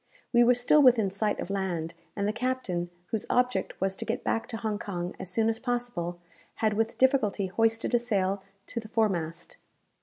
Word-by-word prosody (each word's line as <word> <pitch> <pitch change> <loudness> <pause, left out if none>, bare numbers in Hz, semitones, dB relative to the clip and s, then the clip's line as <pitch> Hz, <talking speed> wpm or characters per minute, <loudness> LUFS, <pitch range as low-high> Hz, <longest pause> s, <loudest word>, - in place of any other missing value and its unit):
We 240 0 +7
were 245 +1 +5
still 250 +5 +5
within 235 -7 +5
sight 205 +2 0
of 195 - -4
land, 175 -4 -2 0.2
and 200 -1 0
the 210 - 0
captain, 230 -8 -2 0.2
whose 220 - -2
object 250 0 +1
was 195 0 0
to - - -2
get - - -3
back 225 +1 0
to 225 - -5
Hong 210 -1 -2
Kong 180 -3 -4
as 180 - -6
soon 220 +4 +1
as 225 0 0
possible, 240 -9 -2 0.4
had 215 -1 +1
with 225 +2 -1
difficulty 255 -7 +3
hoisted 225 +5 +1
a 240 - +5
sail 200 -4 0 0.2
to 235 - -4
the 220 - -9
foremast. 190 -8 -1
220 Hz, 190 wpm, -28 LUFS, 190-240 Hz, 0.4 s, We